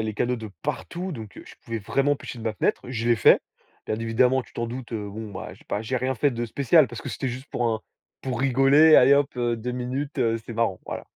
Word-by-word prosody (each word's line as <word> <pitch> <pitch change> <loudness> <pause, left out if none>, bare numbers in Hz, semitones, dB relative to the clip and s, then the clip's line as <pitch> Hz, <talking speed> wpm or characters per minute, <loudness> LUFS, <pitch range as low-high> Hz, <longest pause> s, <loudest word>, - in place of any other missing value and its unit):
les 110 -1 -3
canaux 125 +4 0
de 110 -2 -8
partout, 180 +2 -4
donc 110 -7 -9
je - - -13
pouvais 115 -1 -3
vraiment 135 +7 +1
pêcher 125 - -8
de 115 - -8
ma 110 - 0
fenêtre. - - 0
Je 120 -2 -2
l'ai 120 - +4
fait. 105 - +6 0.5
Bien 110 - -1
évidemment, 125 +3 +2
tu - - -21
t'en 120 - -3
doutes, 120 0 -7
heu, 105 -2 -3
bon, 110 0 -7
ben, 95 - -7
j'ai - - -21
pas 105 - -3
j'ai 130 +3 -2
rien 130 +1 -1
fait 140 +4 +2
de 120 -1 -3
spécial, 140 +5 +4
parce 120 -1 -8
que - - -6
c'était 135 - -3
juste 130 +3 -6
pour 120 - 0
un 110 -1 0 0.4
pour 125 -3 -3
rigoler. 135 +4 +6
Allez 135 +1 +7
hop, 140 0 +3
heu, 120 -1 0
2 120 +2 -4
minutes, 130 +4 -4
heu, 115 -2 +2
c'est 115 - -7
marrant, 115 -5 0
voilà. - - -5
120 Hz, 250 wpm, -25 LUFS, 115-135 Hz, 0.5 s, Allez